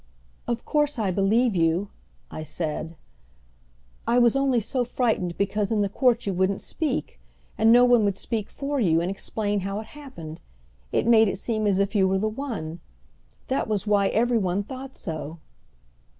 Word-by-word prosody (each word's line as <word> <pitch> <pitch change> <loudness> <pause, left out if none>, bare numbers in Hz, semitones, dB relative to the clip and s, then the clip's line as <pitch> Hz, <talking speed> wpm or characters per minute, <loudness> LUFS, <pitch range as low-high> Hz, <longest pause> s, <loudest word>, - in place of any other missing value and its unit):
"Of 235 -1 -2
course 295 -2 +1
I 205 -4 0
believe 210 +4 +2
you," 170 +4 +1 0.4
I - - -6
said. 155 +1 -4 1.1
"I 235 - +3
was 240 -1 +4
only 275 -3 +2
so 245 +4 -1
frightened 225 -8 -1
because 200 +1 0
in 215 -2 +2
the 200 - -1
court 245 +2 +2
you 200 - -1
wouldn't 190 +2 +1
speak, 305 -3 -3 0.4
and 220 +1 +4
no 245 +1 +7
one 245 -3 +5
would 200 -2 0
speak 215 -1 -3
for 285 0 -3
you 165 -8 +3
and 175 +3 -1
explain 205 +1 -2
how 195 +2 -3
it 220 - -7
happened. 255 - -9 0.5
It - - +1
made 225 -1 +6
it 195 - -2
seem 215 0 -1
as 195 -2 +2
if 200 0 0
you 195 -3 +3
were 190 0 +1
the 210 +3 0
one. 215 - -5 0.7
That 265 - 0
was 210 -2 -1
why 205 -2 +3
every 235 +2 +2
one 190 0 0
thought 265 +4 -9
so." 160 -2 -5
210 Hz, 180 wpm, -25 LUFS, 190-245 Hz, 1.1 s, no